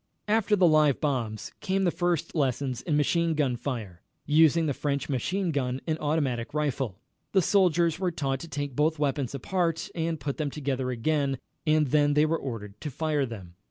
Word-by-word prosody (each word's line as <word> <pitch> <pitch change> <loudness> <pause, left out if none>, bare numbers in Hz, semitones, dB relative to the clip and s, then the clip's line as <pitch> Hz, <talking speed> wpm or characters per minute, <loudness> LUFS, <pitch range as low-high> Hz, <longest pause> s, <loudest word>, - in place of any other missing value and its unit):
After 215 0 +3
the 190 -3 +4
live 155 -3 +4
bombs 120 -7 -2
came 195 +1 0
the 175 - +3
first 175 -2 -1
lessons 130 -4 -1
in 150 -4 0
machine 165 +2 +2
gun 140 -5 +1
fire, 115 -8 -5 0.2
using 160 +2 +4
the 145 - 0
French 140 +1 -2
machine 175 - -1
gun 130 -3 -1
and 160 -1 -1
automatic 145 -5 -1
rifle. 135 -8 -1 0.4
The 190 - +5
soldiers 170 -4 +3
were 185 -2 +1
taught 135 -6 -2
to 170 - -8
take 145 -3 -4
both 155 +3 +2
weapons 140 -3 -1
apart 165 +3 -1
and 165 -1 -2
put 140 +1 -3
them 150 -2 -1
together 135 -3 -2
again, 135 +2 0 0.3
and 155 -2 +3
then 145 +1 +3
they 150 +1 +5
were 160 +1 0
ordered 105 -6 -7
to 150 - -3
fire 145 0 0
them. 95 -7 -9
150 Hz, 185 wpm, -27 LUFS, 130-160 Hz, 0.4 s, The